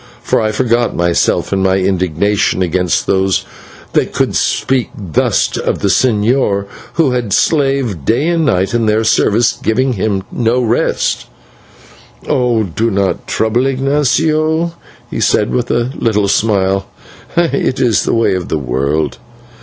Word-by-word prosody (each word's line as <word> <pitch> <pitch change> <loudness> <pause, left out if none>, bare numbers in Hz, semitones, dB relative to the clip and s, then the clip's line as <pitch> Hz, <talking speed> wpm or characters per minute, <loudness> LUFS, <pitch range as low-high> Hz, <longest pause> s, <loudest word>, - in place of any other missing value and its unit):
for - - +1
I 110 -1 0
forgot 120 +1 0
myself 85 +2 +1
in 95 - +1
my 95 0 +2
indignation 95 +1 0
against 90 0 0
those 95 0 +1 0.5
that - - 0
could - - 0
speak 130 -2 0
thus 90 -7 0
of - - -2
the 100 - +1
señor, 105 -3 +1 0.3
who 160 -6 +2
had 120 -4 -2
slaved 135 - +1
day 120 - +1
and 170 -1 +1
night 95 -8 +1
in 115 -2 +1
their 110 +1 +2
service, 110 0 +2
giving 130 +4 +1
himself 100 -2 -2
no 120 +1 +1
rest. 120 -1 0 1.0
"Do 115 -4 0
not 100 -2 -1
trouble, 120 +4 0
Ignatio," 155 +4 +1 0.4
he - - -3
said, 105 - +1
with 125 -1 -1
a 120 +2 0
little 105 -6 0
smile, 95 -2 +1 0.5
"it 165 -6 +1
is 120 -4 +2
the - - 0
way 115 -3 +2
of 90 -2 -3
the 80 - 0
world. 70 +3 -2
110 Hz, 140 wpm, -14 LUFS, 95-125 Hz, 1.0 s, my